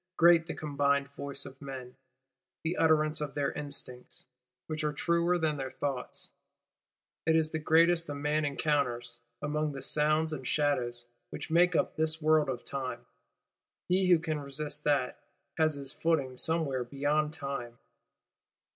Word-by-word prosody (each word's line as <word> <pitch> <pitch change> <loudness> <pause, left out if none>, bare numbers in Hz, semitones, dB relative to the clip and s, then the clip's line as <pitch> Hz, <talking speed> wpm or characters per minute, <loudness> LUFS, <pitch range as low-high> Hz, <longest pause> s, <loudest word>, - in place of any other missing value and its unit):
Great 170 0 +7
is 165 - -21
the 165 - -4
combined 140 -2 +1
voice 140 0 -3
of 135 +1 -11
men; 130 -3 -7 0.7
the 165 +2 -1
utterance 155 -1 +3
of 150 -2 -4
their 145 -1 0
instincts, 140 -4 -5 0.4
which 155 0 -3
are 150 - +1
truer 170 +3 +1
than 155 -3 0
their 135 -1 -3
thoughts: 135 -2 -5 1.0
it 160 - +5
is 160 -1 +2
the 160 - -2
greatest 165 +1 +4
a 145 - -3
man 150 +2 0
encounters, 135 -5 -1 0.2
among 150 0 -1
the 135 - -6
sounds 155 +1 +2
and 130 -4 -5
shadows, 120 -5 0 0.2
which - - -7
make 175 +1 +4
up - - +1
this 160 0 0
World 155 -2 +3
of 125 -2 -4
Time. 135 -2 -4 0.8
He 185 +1 +3
who 175 - +7
can 160 -2 -2
resist 145 +1 -4
that, 145 -4 +1 0.4
has 155 -1 +3
his 140 -1 -5
footing 140 -6 0
some 160 +5 +1
where 130 -3 -2
beyond 145 +4 0
Time. 140 -6 -5
150 Hz, 155 wpm, -30 LUFS, 140-160 Hz, 1.0 s, Great